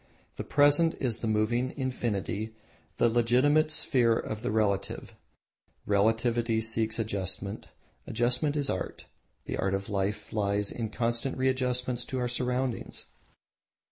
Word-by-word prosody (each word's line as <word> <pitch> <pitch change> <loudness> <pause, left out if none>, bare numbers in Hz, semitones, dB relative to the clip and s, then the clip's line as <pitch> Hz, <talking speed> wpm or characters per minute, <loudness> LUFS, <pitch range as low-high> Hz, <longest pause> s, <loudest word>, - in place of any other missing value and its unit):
The - - -3
Present 145 +3 +4
is 120 -4 +1
the 115 - -3
moving 115 +4 +1
Infinity, 110 -4 -2 0.4
the - - +4
legitimate 125 +7 +3
sphere 120 -6 +3
of 110 0 -4
the - - -2
Relative. 105 -2 -1 0.7
Relativity 115 +3 +2
seeks 110 0 0
Adjustment; 100 -2 -3 0.4
Adjustment 125 +6 +1
is 145 -2 +1
Art. 95 - -4 0.4
The - - -3
art 95 0 0
of 100 +1 -5
life 100 +1 -2
lies 100 -1 0
in 115 -2 -3
a - - -11
constant 120 +3 -1
readjustment 125 -1 0
to 130 - -3
our 125 -1 0
surroundings. 125 0 -2
115 Hz, 130 wpm, -29 LUFS, 110-125 Hz, 0.7 s, Present